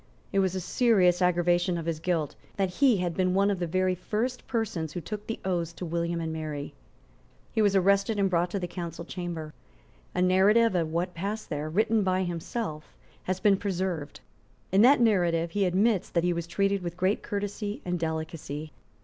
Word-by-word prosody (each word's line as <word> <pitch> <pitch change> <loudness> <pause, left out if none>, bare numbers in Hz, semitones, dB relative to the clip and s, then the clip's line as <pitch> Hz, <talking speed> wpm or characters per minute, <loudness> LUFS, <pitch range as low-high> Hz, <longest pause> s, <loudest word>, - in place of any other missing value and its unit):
It 195 - +3
was 190 -1 +1
a - - -1
serious 185 -3 +3
aggravation 175 0 +2
of 165 - -4
his 165 -2 -2
guilt 165 -3 -1 0.2
that 190 -2 +1
he 255 +2 +4
had 175 -2 -1
been 185 -1 +1
one 200 +1 +3
of 195 - -2
the 175 - -1
very 185 +2 +1
first 225 +7 -3
persons 190 -9 -2
who 180 - -3
took 210 +4 -6
the 225 - -4
oaths 170 -3 -1
to 180 - -6
William 170 0 -1
and 160 -1 -3
Mary. 155 -2 -5 0.8
He 220 - +1
was 205 -2 +3
arrested 200 +3 +3
and 200 -1 +3
brought 175 -1 +1
to 200 - -2
the 180 - -3
Council 170 -1 -6
Chamber. 170 -4 -5 0.6
A - - +1
narrative 200 +5 +4
of 165 -3 0
what 175 +2 -1
passed 200 +5 -4
there, 150 +1 -2
written 215 +6 +2
by 185 -1 +1
himself, 170 -1 -4 0.3
has 185 0 -1
been 200 -2 +4
preserved. 185 -6 -3 0.5
In 195 +2 +5
that 260 +4 +7
narrative 175 -7 +2
he 200 +1 +1
admits 195 +2 +2
that 170 - 0
he 175 0 +2
was 170 -1 -4
treated 195 +2 +1
with 175 0 -5
great 185 +3 +1
courtesy 205 0 -4
and 180 -1 -1
delicacy. 160 -2 -4
180 Hz, 190 wpm, -28 LUFS, 170-200 Hz, 0.8 s, that